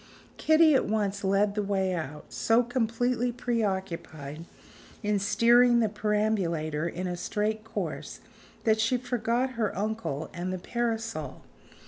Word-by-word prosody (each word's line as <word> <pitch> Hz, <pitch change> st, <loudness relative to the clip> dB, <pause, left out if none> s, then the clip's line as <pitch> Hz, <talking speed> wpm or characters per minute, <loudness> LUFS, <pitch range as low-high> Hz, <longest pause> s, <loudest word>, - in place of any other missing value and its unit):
Kitty 315 Hz, 0 st, +5 dB
at 265 Hz, -, +3 dB
once 205 Hz, -2 st, -1 dB
led 200 Hz, +1 st, +2 dB
the 210 Hz, -, -1 dB
way 195 Hz, -2 st, 0 dB
out; 150 Hz, -3 st, -5 dB
so 225 Hz, -, +3 dB
completely 245 Hz, 0 st, 0 dB
preoccupied 190 Hz, -, -3 dB, 0.6 s
in 210 Hz, -1 st, +1 dB
steering 235 Hz, +4 st, +5 dB
the 220 Hz, -2 st, +2 dB
perambulator 195 Hz, -8 st, 0 dB
in 180 Hz, +2 st, -4 dB
a 180 Hz, -1 st, -2 dB
straight 215 Hz, +4 st, -2 dB
course 225 Hz, -, -5 dB, 0.4 s
that 220 Hz, -1 st, +3 dB
she 230 Hz, +3 st, +2 dB
forgot 245 Hz, +1 st, -1 dB
her 225 Hz, -6 st, -2 dB
uncle 210 Hz, -8 st, -3 dB
and 180 Hz, +1 st, -3 dB
the 185 Hz, -, -2 dB
parasol. 225 Hz, -, -3 dB
210 Hz, 130 wpm, -28 LUFS, 185-235 Hz, 0.6 s, Kitty